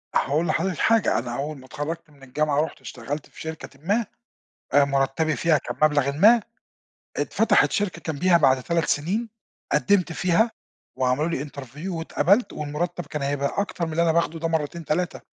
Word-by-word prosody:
هاقول 155 +5 +1
لحضرتِك 180 0 0
حاجة، 225 -1 +3
أنا 120 0 -5
اوّل 145 +2 -4
ما 130 - -14
اتخرجت 150 +4 -5
من 140 -2 -20
الجامعة 145 +2 0
رُحت 160 - -5
اشتغلت 135 +5 -6
في - - -13
شركةٍ 160 -3 -8
ما، 210 +5 +1 0.7
آآ 145 0 +6
مُرتّبي 140 +3 0
فيها 165 -2 +3
كان - - -6
مبلغٍ 145 -2 +1
ما، 210 +12 +6 0.8
اتفتحت - - +3
شركة 200 -6 -2
جمبيها 175 +4 +4
بعد 130 -5 +3
3 170 +2 0
سنين، 200 +11 -1 0.4
قدمت 195 -4 +2
فيها، 185 +8 +2 0.5
وعملوا 130 +4 +1
لي 150 -4 -2
interview 140 +2 -9
واتقبلت، 190 +5 +1
والمرتب 150 +4 -3
كان 150 - -5
هيبقى 140 0 -1
أكتر 180 -4 -3
من 160 - -5
اللي 165 +2 +1
أنا 165 - +3
باخده 165 0 0
ده 165 - -1
مرّتين 160 0 -2
3، 175 +3 -1
155 Hz, 170 wpm, -24 LUFS, 140-175 Hz, 0.8 s, آآ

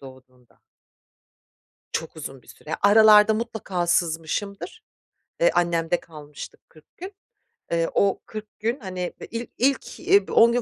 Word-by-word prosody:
doğduğunda. 130 -2 -17 1.3
Çok 160 0 -4
uzun 135 -4 -8
bir - - -26
süre. 155 - -7
Aralarda 210 +1 +7
mutlaka 215 -6 -3
sızmışımdır, 175 - -2 0.6
eee, - - +5
annemde 170 0 +1
kalmıştık 150 -3 -12
40 155 -1 -22
gün. 375 +4 -8 0.6
Eee, 165 0 +1
o 200 -1 +2
40 215 -1 -10
gün, 230 +5 -1
hani, 185 -4 -5
eee, - - -9
il 230 +1 -4
ilk, 270 +2 0
eee, 400 +1 +4
10 235 +1 +6
gün 245 0 +1
190 Hz, 135 wpm, -24 LUFS, 160-225 Hz, 1.3 s, Aralarda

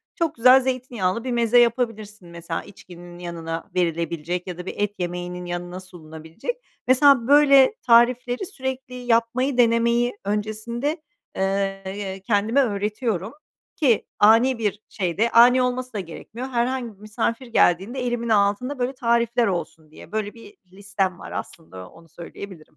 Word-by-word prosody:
çok 330 -3 -1
güzel 255 +3 +7
zeytinyağlı 240 -6 -2
bir 255 - -3
meze 235 0 +3
yapabilirsin. 220 -5 -1
Mesela, 170 -1 -5
içkinin 175 -3 -13
yanına 165 -2 -6
verilebilecek 170 0 -2
ya 180 -2 -6
da 180 - -8
bir - - -5
et 205 0 -1
yemeğinin 180 0 -4
yanına 175 +1 -5
sunulabilecek. 165 - -8 0.3
Mesela, 260 -2 +5
böyle 280 +3 +6
tarifleri 245 +5 +3
sürekli 265 -7 -6
yapmayı 245 +2 0
denemeyi 235 0 +2
öncesinde, 220 - -3 0.3
eee, 195 0 -1
y 195 -2 -5
kendime 215 +6 +2
öğretiyorum 210 -2 -2 0.4
ki 275 - +2
ani 230 +5 +5
bir 210 -3 -2
şeyde, 195 +4 -1
ani 245 +2 +6
olması 250 0 -2
da 205 - -3
gerekmiyor, 215 +8 -8
herhangi 245 -2 -2
bir 195 - -28
misafir 230 +4 -3
geldiğinde 220 +3 +2
elimin 240 -1 -2
altında 215 +6 +1
böyle 250 +2 -1
tarifler 235 -1 +1
olsun 165 -4 -5
diye. - - -14
Böyle 215 -1 -3
bir 225 -3 -15 0.2
listem 195 -2 -3
var - - -10
aslında, 95 - -8
onu 165 0 -19
söyleyebilirim. 175 +1 -10
220 Hz, 140 wpm, -23 LUFS, 185-245 Hz, 0.4 s, güzel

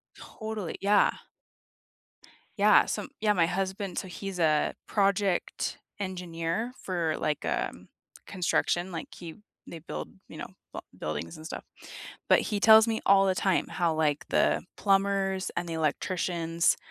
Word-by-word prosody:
Totally 220 -5 -6
yeah. 205 +1 +4 1.5
Yeah, - - +6
so - - -3
yeah, 210 -1 +3
my 170 -4 +3
husband 190 +1 -2
so 190 - -6
he's 190 0 -6
a 155 -2 +2
project 200 -2 0 0.2
engineer 180 +3 -3
for, 170 -4 -1
like, 150 -2 -1
um, - - -3 0.4
construction, 175 0 0
like, 165 - -6
he 165 -2 -9 0.3
they 170 - -7
build, 160 - -6 0.2
you 155 - -10
know, - - -6 0.3
b - - -4 0.2
buildings 75 +2 -4
and 155 - -11
stuff. - - -6 0.7
But - - +7
he 205 -2 -2
tells 220 +1 +8
me 225 -1 -1
all 195 0 +6
the 185 - +2
time 190 -1 +1
how, 170 -3 0
like, 150 -2 0
the - - +2
plumbers, 195 -1 +1
and 175 - -2
the 165 - -3
electricians, 165 +1 0
185 Hz, 140 wpm, -28 LUFS, 165-195 Hz, 1.5 s, tells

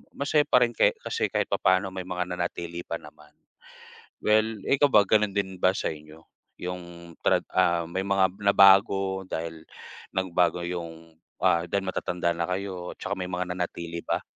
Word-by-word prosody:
masaya 145 +1 +2
pa 125 - +4
rin 120 - -6
ke - - +4
kasi - - -1
kahit - - 0
papa'no 95 +1 +2
may 95 -1 -5
mga 90 -1 -2
nanatili 85 -1 -4
pa 85 - -3
naman. 75 -1 -16 0.9
Well, 110 0 +2
ikaw 140 +1 +4
ba 105 - +7
ganun 105 -1 +2
din 95 -2 -2
ba 95 - +4
sa - - -1
inyo, 75 +1 -13 0.3
yung 85 -1 -7
trad - - +2
ah, 85 -2 +2
may 95 +3 -2
mga 95 -1 +1
nabago 95 -1 +4
dahil 80 -1 -5 0.5
nagbago 90 -2 +1
yung, 85 -2 -7 0.3
ah, 85 0 +3
dahil 100 -1 -1
matatanda 90 -2 -1
na 85 +1 -2
kayo, 90 -1 -4
tsaka 100 -1 -3
may 90 - -3
mga 90 0 -2
nanatili 85 -1 -4
ba? - - -2
90 Hz, 165 wpm, -26 LUFS, 85-95 Hz, 0.9 s, ba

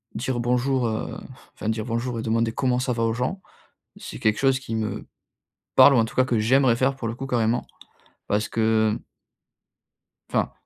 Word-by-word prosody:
dire 130 -1 -2
«bonjour», 125 +1 +1
heu, 110 -1 -3
f - - -12 0.2
enfin 110 - -4
dire 110 -1 -2
«bonjour» 120 +1 -2
et - - -4
demander 115 0 +1
«comment 125 +1 0
ça 125 0 -1
va?» 115 -1 -1
aux 115 0 +1
gens, 125 - -2 0.6
c'est - - -8
quelque 110 0 +2
chose 135 -1 +2
qui 115 -4 -4
me 110 -1 -3 0.7
parle 140 - +8
ou - - +4
en 115 - +4
tout 110 - -8
cas, 130 - +4
que 120 -3 +1
j'aimerais 125 +2 +3
faire 135 +2 +1
pour 120 -4 -4
le 115 - -3
coup 135 +3 -6
carrément 120 -2 0 0.6
parce 105 +1 0
que, 110 -1 +2
mmh - - -9 1.3
enfin, - - 0
115 Hz, 195 wpm, -24 LUFS, 110-130 Hz, 1.3 s, parle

